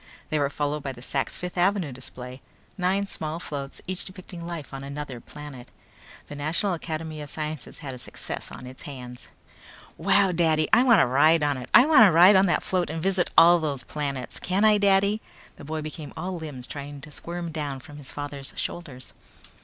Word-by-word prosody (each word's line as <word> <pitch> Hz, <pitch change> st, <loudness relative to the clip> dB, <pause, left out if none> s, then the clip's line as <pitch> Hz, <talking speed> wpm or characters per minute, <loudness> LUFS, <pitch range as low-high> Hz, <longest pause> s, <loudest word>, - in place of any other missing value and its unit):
They 155 Hz, -, +2 dB
were 140 Hz, -1 st, +2 dB
followed 145 Hz, +1 st, -2 dB
by 135 Hz, -1 st, -4 dB
the 120 Hz, -, -13 dB
Sak's 135 Hz, 0 st, -2 dB
Fifth 180 Hz, 0 st, -5 dB
Avenue 185 Hz, -4 st, +2 dB
display; 125 Hz, 0 st, -9 dB, 0.3 s
nine 190 Hz, +2 st, +1 dB
small 160 Hz, -4 st, -4 dB
floats, 140 Hz, -4 st, -6 dB
each 185 Hz, +1 st, -4 dB
depicting 185 Hz, -2 st, -9 dB
life 165 Hz, -6 st, -6 dB
on 135 Hz, 0 st, -5 dB
another 140 Hz, -2 st, -6 dB
planet. 145 Hz, -4 st, -10 dB, 0.6 s
The 145 Hz, -, -8 dB
National 160 Hz, +7 st, 0 dB
Academy 160 Hz, -2 st, -5 dB
of 145 Hz, -, -7 dB
Sciences 155 Hz, -2 st, -5 dB
had 135 Hz, -, -4 dB
a 125 Hz, -, -8 dB
success 125 Hz, -, -6 dB
on 125 Hz, -, -8 dB
its 130 Hz, +1 st, -9 dB
hands. 125 Hz, -3 st, -9 dB, 0.7 s
"Wow! 195 Hz, +2 st, +4 dB
Daddy, 160 Hz, -3 st, +2 dB
I -, -, +8 dB
wanna 235 Hz, -7 st, +6 dB
ride 150 Hz, +5 st, +4 dB
on 145 Hz, -1 st, +2 dB
it! 125 Hz, -1 st, -8 dB
I 245 Hz, -, +8 dB
wanna 260 Hz, -, +7 dB
ride 180 Hz, +5 st, +8 dB
on 190 Hz, +1 st, +5 dB
that 175 Hz, -, +1 dB
float 180 Hz, -2 st, 0 dB
and 160 Hz, +1 st, -3 dB
visit 190 Hz, -2 st, +1 dB
all 175 Hz, +1 st, +8 dB
those 145 Hz, -5 st, -2 dB
planets! 140 Hz, -3 st, -4 dB
Can 190 Hz, +4 st, +1 dB
I, 210 Hz, -1 st, +6 dB
Daddy!" 200 Hz, +1 st, +3 dB, 0.4 s
The -, -, -10 dB
boy 155 Hz, +1 st, -3 dB
became 155 Hz, -1 st, -7 dB
all 180 Hz, +3 st, -3 dB
limbs 150 Hz, -7 st, -6 dB
trying 145 Hz, 0 st, -7 dB
to 150 Hz, -, -11 dB
squirm 170 Hz, +2 st, -5 dB
down 145 Hz, -4 st, -4 dB
from 145 Hz, +3 st, -12 dB
his 145 Hz, -3 st, -10 dB
father's 145 Hz, -1 st, -6 dB
shoulders. 140 Hz, -7 st, -6 dB
155 Hz, 195 wpm, -26 LUFS, 140-180 Hz, 0.7 s, I